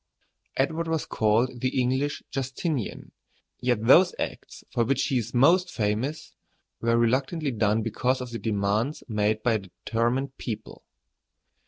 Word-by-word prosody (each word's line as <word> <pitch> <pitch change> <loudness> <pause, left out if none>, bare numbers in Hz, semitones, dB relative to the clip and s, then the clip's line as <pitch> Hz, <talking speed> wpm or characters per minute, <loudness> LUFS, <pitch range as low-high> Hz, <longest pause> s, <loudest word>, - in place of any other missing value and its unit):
] - - -22
Edward 160 +5 0
was 160 -1 -1
called 115 +3 +1
the 130 +1 0
English 130 +4 0
Justinian; 135 - -3 0.5
yet 120 -3 0
those 175 +9 +6
acts - - -5
for 120 - +2
which 135 +3 +1
he 130 - +1
is 115 0 -5
most 175 +9 +4
famous 115 +8 -2 0.5
were 115 0 +2
reluctantly 130 +6 +1
done 110 -1 +1
because 125 +4 0
of 125 -2 -6
the 115 - -4
demands 110 +6 0
made 110 -1 0
by 120 - +3
a 110 - +1
determined 120 +7 -2
people. 110 -3 -6
125 Hz, 145 wpm, -26 LUFS, 110-135 Hz, 0.5 s, those